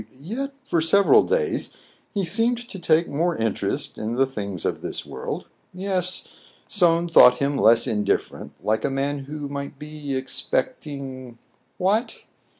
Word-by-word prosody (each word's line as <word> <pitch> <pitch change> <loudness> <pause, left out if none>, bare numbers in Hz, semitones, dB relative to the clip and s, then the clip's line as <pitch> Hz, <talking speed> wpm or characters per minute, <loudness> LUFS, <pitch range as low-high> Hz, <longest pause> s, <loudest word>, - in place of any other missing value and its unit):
Yet 250 - -4
for 170 - +2
several 195 +5 +5
days 470 -3 -1 0.3
he 200 -4 -1
seemed 235 +6 +2
to 195 - -6
take 165 -1 +3
more 165 +4 0
in 115 -4 0
terest - - -3
in 110 +2 -3
the 135 +2 +3
things 100 -9 -4
of - - -1
this - - -4
world. - - -5 0.3
Yes, 185 -1 -1 0.4
Soun 175 -3 +3
thought 125 -6 +7
him 140 +1 0
less 115 -3 +5
indifferent, 105 -2 -1
like 110 +1 +1
a - - +1
man 140 +1 -2
who 145 0 -6
might 140 0 -6
be 150 -1 -6
expecting 135 - -2 0.2
— - - -43
what 205 +6 0
150 Hz, 150 wpm, -23 LUFS, 135-185 Hz, 0.4 s, thought